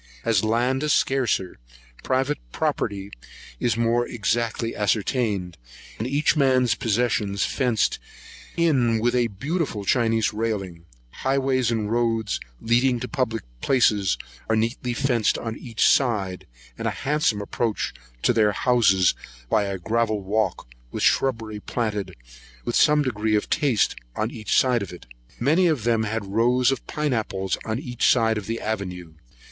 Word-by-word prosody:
As 110 -3 +2
land 120 +4 +1
is 150 -1 +2
scarcer, 120 - 0 0.4
private 135 +3 0
property 100 +7 -2 0.5
is 115 -1 0
more 115 +1 +1
exactly 115 +1 -1
ascertained, 105 -3 -1 0.4
and 110 - -2
each 145 +5 +2
man's 130 -5 +3
possession 115 -4 0
fenced 120 +1 +1 0.6
in 130 -9 +3
with 120 +2 +1
a 120 -1 +2
beautiful 130 - -3
Chinese 115 0 +2
railing. 100 -6 -3 0.3
Highways, 130 - 0
and 110 -2 -1
roads 115 -3 0 0.2
leading 120 +2 +2
to - - -3
public 115 -7 -2 0.2
places, 105 - +2 0.3
are 110 - +3
neatly 115 +2 -1
fenced 120 -4 +1
in - - -7
on 115 -1 -3
each 115 -4 +1
side, 100 -8 +1 0.3
and - - -2
a - - -4
handsome 145 -7 +1
approach 110 +2 -2 0.3
to - - +4
their 105 -3 +3
houses 100 -8 +3 0.4
by 105 - +3
a 100 -1 -3
gravel 110 +2 0
walk, 100 - -1 0.2
with - - -4
shubbery 115 -5 +1
planted 105 -2 -3 0.5
with - - -2
some 150 0 +5
degree 110 -4 0
of 105 - -1
taste 135 -8 +2 0.2
on 110 +2 -1
each 110 -3 -1
side 125 -3 +3
of 100 - -5
it. 90 - -11 0.3
Many 160 +9 +3
of 150 -9 0
them 115 -1 +2
had 110 0 -3
rows 120 +5 +2
of 135 - -4
pine 150 -2 -1
apples 95 -5 -1
on 110 0 -2
each 125 -2 0
side 115 -3 +2
of 100 - -10
the 115 +1 -2
avenue. 90 -6 -4
115 Hz, 150 wpm, -24 LUFS, 105-125 Hz, 0.6 s, some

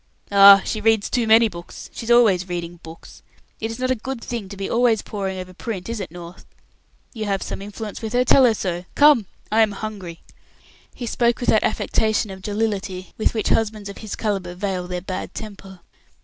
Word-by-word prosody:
"Ah! 200 -1 +9
She 215 - -3
reads 220 -1 +2
too 240 -3 +1
many 225 +1 +6
books; 170 -4 -10
she's 230 - -7
always 205 -7 +4
reading 175 -1 -5
books. 160 0 -13 0.4
It 225 - -3
is 225 - -6
not 255 0 -1
a - - +2
good 255 +2 -5
thing 230 -4 -5
to 200 - -9
be 195 - -3
always 235 -2 +2
poring 195 -2 -4
over 185 0 -7
print, 190 -2 -6
is 230 -1 -3
it, 190 - -5
North? 175 +1 -11 0.7
You 220 -3 -4
have 195 -2 -1
some - - -6
influence 210 +1 -7
with 220 0 -5
her; 250 +1 +3
tell 265 +1 +6
her 230 -3 +4
so. 180 -3 -3
Come, 290 -9 +5 0.2
I 220 +1 +4
am 215 -2 +3
hungry." 195 -5 -7 0.7
He 245 - -6
spoke 235 +1 +1
with 245 - 0
that 215 - +4
affectation 215 -1 0
of 190 0 -9
jollity 200 -3 -3
with 220 - +1
which 220 - 0
husbands 215 -2 0
of 200 - -9
his 215 -2 -6
calibre 195 -5 -3
veil 185 -2 -3
their 180 0 -4
bad 185 0 -6
temper. 195 -4 -9
205 Hz, 205 wpm, -22 LUFS, 185-225 Hz, 0.7 s, Ah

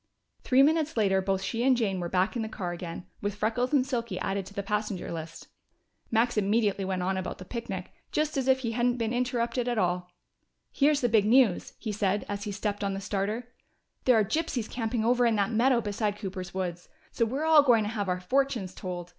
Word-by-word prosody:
Three 265 +1 +5
minutes 315 -1 +2
later 195 -3 +3
both 195 0 -1
she 230 - -2
and 260 -1 +4
Jane 200 -6 0
were 175 -1 -3
back 185 +6 +1
in 235 - -1
the 220 - -3
car 185 -5 -4
again, 175 0 -6 0.2
with 205 0 -2
Freckles 225 +4 0
and 275 -4 +3
Silky 235 -7 -3
added 195 0 -2
to - - -12
the 200 - -2
passenger 210 -2 -2
list. 165 -1 -7 0.6
Max 235 +1 +2
immediately 205 -1 +2
went 185 -1 -2
on 190 +1 0
about 185 - -4
the 185 - -10
picnic, 195 -5 -5 0.2
just 305 0 0
as 270 -2 -1
if 265 0 +4
he 230 -3 -2
hadn't 240 +1 +1
been 230 -1 -1
interrupted 245 0 -1
at 240 -1 0
all. 180 -2 0 0.6
"Here's 290 0 +3
the 245 - +3
big 220 -3 +3
news," 230 -4 +3
he 220 - -4
said, 205 -1 0
as 205 +1 -4
he 205 - -3
stepped 205 0 -3
on 195 -1 -1
the - - -3
starter: 210 +5 -3 0.5
"There 250 -3 +6
are 215 - +3
gypsies 275 -4 -1
camping 225 -1 -2
over 245 +1 +3
in 230 - +2
that 205 +2 +1
meadow 240 +2 +3
beside 205 -1 -2
Cooper's 190 -2 -6
woods! 180 -2 -4 0.2
So - - 0
we're 265 +7 -1
all 320 -2 +7
going 240 -6 +4
to 210 - -2
have 205 -4 -2
our 180 0 0
fortunes 235 -1 0
told. 175 -2 -6
215 Hz, 220 wpm, -28 LUFS, 195-245 Hz, 0.6 s, all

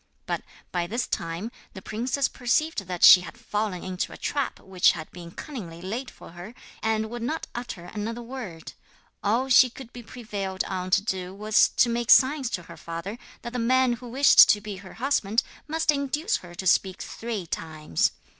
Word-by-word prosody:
But - - -2 0.3
by 175 -1 -1
this 235 +6 -1
time 170 +7 -4 0.2
the 190 - -7
princess 255 +5 -1
perceived 250 - 0
that 180 -2 -4
she 180 - +11
had 175 - -10
fallen 205 -4 -3
into 185 -1 -3
a - - -9
trap 280 -3 -2
which 185 -2 +3
had 155 -2 -8
been 175 -1 -10
cunningly 180 - -8
laid 225 +9 -4
for - - -14
her, 175 +7 -10 0.3
and 220 0 0
would 240 0 -5
not 310 +8 -2
utter 240 -8 -6
another 225 +5 -5
word. 230 -10 -8 0.5
All 230 +6 +1
she 255 -1 +7
could 245 0 -12
be 245 - -8
prevailed 205 -5 -4
on 185 -1 -4
to 195 - +3
do 190 -2 -3
was 210 +1 +4
to - - +6
make 235 0 -2
signs 270 -1 +5
to 180 - -4
her - - -12
father 170 +7 -6 0.2
that 235 0 -6
the 250 - -2
man 255 +1 +3
who 245 0 -8
wished 270 +3 +7
to 210 - +5
be 205 -1 -7
her 185 0 -11
husband 230 -4 +1 0.2
must 320 0 +2
induce 295 - 0
her 175 -1 -12
to 190 - -6
speak 190 +1 +2
three 225 -5 -5
times. 155 - -1
220 Hz, 190 wpm, -26 LUFS, 185-245 Hz, 0.5 s, she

